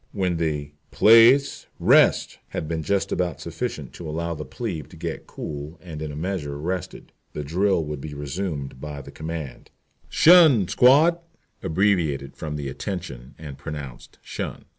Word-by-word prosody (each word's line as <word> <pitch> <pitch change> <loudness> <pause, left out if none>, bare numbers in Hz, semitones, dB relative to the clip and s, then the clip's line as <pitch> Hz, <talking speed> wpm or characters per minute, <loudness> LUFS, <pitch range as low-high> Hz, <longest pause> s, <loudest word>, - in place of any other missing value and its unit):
When 90 -4 0
the 75 -3 -2 0.2
"place, 115 +5 +5
rest" - - +4
had 80 - -5
been 80 0 -2
just 100 +5 -1
about 90 -2 -1
sufficient - - -5
to 80 - -8
allow 85 +2 -2
the 75 -1 -6
plebe 80 - -5
to - - -14
get - - -5
cool 75 +3 -7
and 80 -4 -9
in 75 -1 -4
a - - -8
measure 80 -4 -3
rested, 90 +4 -5 0.2
the 75 - -4
drill 90 +3 +1
would 75 -2 -5
be 75 0 -7
resumed 70 -2 -4
by 75 -2 -6
the - - -11
command 80 -5 -7 0.4
"'tion, 160 - +6
squad" 150 +7 +5 0.4
(abbreviated 80 -7 0
from 75 -1 -5
"attention" 70 -2 -6
and 70 -3 -9
pronounced 70 -3 -8
"shun"). - - -6
80 Hz, 150 wpm, -24 LUFS, 75-95 Hz, 0.4 s, tion